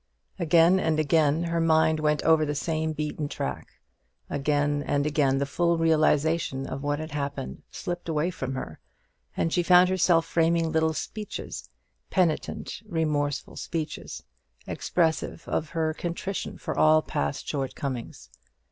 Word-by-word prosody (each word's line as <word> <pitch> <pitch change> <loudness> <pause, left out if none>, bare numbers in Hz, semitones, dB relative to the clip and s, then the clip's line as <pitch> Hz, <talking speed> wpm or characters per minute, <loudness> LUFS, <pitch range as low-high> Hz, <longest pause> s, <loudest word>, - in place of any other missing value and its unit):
Again 170 +2 +5
and 160 -3 +1
again 155 +1 +3
her 170 0 0
mind 160 -1 +3
went 150 -1 +1
over 160 -1 +5
the 150 -1 -1
same 160 +1 -1
beaten 150 -1 -3
track; 65 - -5 0.6
again 145 0 +1
and 145 0 0
again 145 -3 +2
the 140 - 0
full 170 +4 +1
realization 155 -3 +2
of 135 - -5
what 145 0 -1
had 155 0 -6
happened 140 - -4
slipped 175 -1 -5
away 160 +3 0
from 130 -5 -4
her, 80 -11 -6 0.6
and 165 - 0
she 180 - +3
found 180 +1 +6
herself 175 -3 +3
framing 165 0 +2
little 160 0 +2
speeches 210 +6 -6 0.4
penitent, 175 +1 -1
remorseful 150 -5 -1
speeches 160 -3 -5 0.4
expressive 165 -3 -1
of 155 - -1
her 160 -1 -1
contrition 175 +4 -4
for - - -4
all 155 0 +5
past 70 0 -3
shortcomings. 135 -3 -4
155 Hz, 140 wpm, -26 LUFS, 145-165 Hz, 0.6 s, found